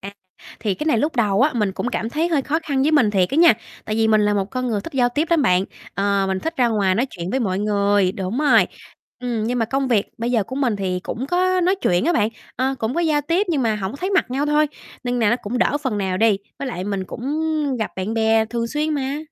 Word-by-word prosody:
À, 200 +1 -8 0.5
thì 205 -4 0
cái 300 - -5
này 240 -8 +3
lúc 300 +2 -1
đầu 210 -1 +2
á, 305 - +3
mình 210 -4 0
cũng 240 - -3
cảm 230 -2 -3
thấy 325 +5 0
hơi 300 -5 +1
khó 305 +4 0
khăn 275 -3 0
với 310 +2 +2
mình 245 -9 +4
thiệt 185 -3 +2
á 275 - -1
nha, 335 -8 +7 0.3
tại 215 - -2
vì 225 0 +2
mình 215 -1 +4
là 205 0 +2
một 195 - +1
con 255 -1 -2
người 210 -3 -1
thích 330 - -9
giao 250 -2 +2
tiếp 295 +6 -1
lắm 330 -4 +4
bạn, 185 -4 +3 0.3
ờ, 200 0 +1
mình 190 0 0
thích 325 +1 -4
ra 245 -2 +3
ngoài 200 -4 +1
nói 240 +7 +1
chuyện 175 +1 -6
với 265 - 0
mọi 190 -4 -1
người, 200 -2 +2
đúng 195 +6 -3
rồi, 300 -1 +5 0.5
ừm. 235 -3 -2
Nhưng 245 +2 -1
mà 230 - +2
công 270 +3 -1
việc 215 -4 +2
bây 235 +1 -1
giờ 230 -4 +2
của 260 - -7
mình 245 -7 +1
thì 185 -2 -2
cũng 250 +8 -5
có 365 +2 +2
nói 365 +2 +3
chuyện 175 +5 +2
á 345 - +2
bạn, 210 -9 +2 0.3
ơ, 265 +1 0
cũng 225 +2 -2
có 340 - +1
giao 310 -3 +2
tiếp 340 +8 0
nhưng 285 -6 +1
mà 220 -2 +1
hổng 195 0 -4
có - - -7
thấy 370 +5 -3
mặt 380 -9 +1
nhau 275 +3 0
thôi, 300 +1 +3 0.4
nên 245 0 -1
nà 225 -3 +3
nó 240 - +3
cũng 230 +5 -3
đỡ 290 - +2
phần 235 -7 -1
nào 190 -2 -1
đi, 210 -1 +3 0.2
với 275 - -3
lại 185 -6 -4
mình 200 -2 -2
cũng 230 - -9 0.5
gặp 220 - -2
bạn 190 +4 -3
bè 225 0 +3
thường 230 +1 -2
xuyên 300 +5 -1
mà. 275 +1 -2
235 Hz, 280 wpm, -21 LUFS, 205-285 Hz, 0.5 s, nha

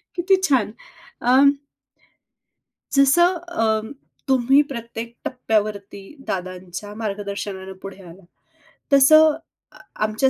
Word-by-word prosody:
किती 365 +2 +3
छान 240 -6 +1 0.5
अ 250 +2 +4 1.6
जसं 315 +7 +4 0.3
अं, 220 +2 0 0.4
तुम्ही 265 +2 +4
प्रत्येक 235 -2 -7
टप्प्यावरती 210 -5 -2 0.3
दादांच्या 185 +2 -6
मार्गदर्शनाने 200 -2 -5
पुढे 195 0 -9
आलात, 175 +2 -14 0.7
तसं 310 +3 +7 0.4
अ, - - -18 0.3
आमच्या 215 +5 +1
220 Hz, 85 wpm, -21 LUFS, 200-270 Hz, 1.6 s, तसं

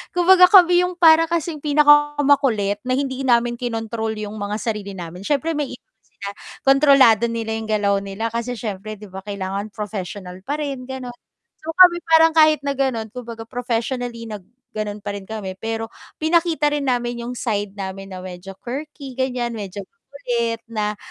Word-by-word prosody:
kumbaga 365 +1 +7
kami 355 -3 +7
'yong 360 0 -2
para 330 -1 +6
kasing 335 -2 -2
pinaka 295 0 +5
makulit 225 -8 +2
na 255 - +2
hindi 270 -1 -2
namin 240 -2 +2
kinontrol 225 -2 -3
'yong 210 -1 -5
mga 205 +1 -3
sarili 210 -3 -4
namin. 175 +1 -8
Siyempre 290 +8 0
may 295 -3 -2
iba - - -53
man - - -54
sila 200 - -8 0.4
kontrolado 270 -5 +6
nila 225 -1 -3
'yong 220 - -7
galaw 205 -2 +2
nila 200 +3 -4
kasi 235 +1 -3
siyempre, 215 -1 -5
'di 210 - -11
ba, 190 - -7
kailangan 200 0 -4
professional 200 -3 -6
pa 290 - -1
rin, 275 -4 -4
gano'n. 260 -2 -6 0.5
So 315 - -8
kami, 360 -2 +8
parang 325 0 +6
kahit 310 -2 +5
na 280 - +1
gano'n, 255 -5 -2
kumbaga 235 -2 -7
professionally 245 0 -3
na 215 -2 -6 0.3
gano'n 210 -1 -5
pa - - -3
rin 195 -1 -9
kami 195 -4 -6
pero 225 0 -4 0.2
pinakita 320 -2 +1
rin 290 -2 -1
namin 240 -1 -1
'yong 245 +1 -5
side 205 -4 -2
namin 195 -1 -6
na 185 -1 -8
medyo 185 +1 -9
quirky, 275 +1 -7
ganiyan. 250 -2 -1
Medyo 205 -3 -6
makulit, 235 0 -4
na 210 -1 -1
235 Hz, 175 wpm, -21 LUFS, 210-285 Hz, 0.5 s, kami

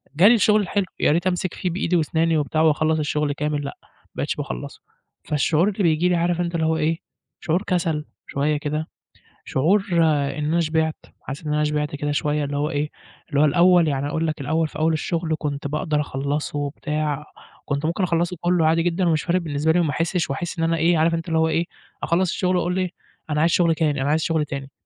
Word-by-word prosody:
جا 175 +7 +6
لي 230 - +7
الشغل 215 -1 +4
الحلو 200 +1 -1
يا - - +3
ريت 170 +4 +1
أمسك 180 -1 -1
فيه 185 - -2
بإيدي 175 0 -1
واسناني 160 0 +2
وبتاع 155 +2 0
وأخلّص 155 0 +2
الشغل 150 -1 0
كامل، 150 0 -2
لأ 140 - -6
ما - - -26 0.3
بقيتش - - -2
باخلّصه، 60 -1 -6 0.4
فالشعور 155 +4 +2
اللي 205 0 -2
بييجي 170 +1 +3
لي 180 - +2
عارف 175 +1 +1
أنت 170 -1 -2
اللي 160 - +1
هو 160 0 +1
إيه 160 +1 0 0.4
شعور 175 +3 0
كسل 165 -6 -1 0.2
شوية 145 +2 0
كده 150 +2 -3 0.6
شعور 190 +9 +2 0.5
إن 150 - -2
أنا 165 +3 +1
شبعت 160 0 0 0.3
حاسس 140 +4 -7
إن 150 - 0
أنا 150 0 +2
شبعت 150 -1 -1
كده 145 0 -2
شوية، 150 0 0
اللي 140 0 -3
هو 150 +1 0
إيه 150 0 -1 0.4
اللي 145 -1 +2
هو - - +6
الأول 175 +2 +5
يعني 140 0 -1
أقول 160 +2 -1
لك 155 -1 -3
الأول 160 +3 0
في - - -8
أول 160 +1 +2
الشغل 160 +1 -1
كنت 145 -2 -3
باقدر 150 +1 -1
أخلصه 145 +1 -3
وبتاع 150 0 -2 0.4
كنت 140 +1 -2
ممكن 170 +4 0
أخلصه 175 0 0
كله 175 -2 +2
عادي 165 +1 +3
جدًا 175 +1 +1
ومش 155 -2 +1
فارق 180 +1 +1
بالنسبة 155 -1 0
لي 175 - +3
وما 165 -3 +1
احسش 165 +1 -1
وأحس 170 +6 -4
إن - - +1
أنا 165 0 +1
إيه 165 +1 +3
عارف 165 +2 +3
أنت 165 +1 -4
اللي 160 0 +2
هو 160 - +3
إيه، 165 +2 +1 0.4
أخلّص 175 +2 +1
الشغل 185 -1 0
وأقول 180 +1 0
إيه 185 -2 -1 0.4
أنا 150 - +1
عايز 165 +2 +3
شغل 165 -2 +3
تاني، 150 -4 0
أنا 135 - 0
عايز 155 +2 +2
شغل 160 -2 +1
تاني، 140 -1 -6
160 Hz, 220 wpm, -22 LUFS, 150-170 Hz, 0.6 s, لي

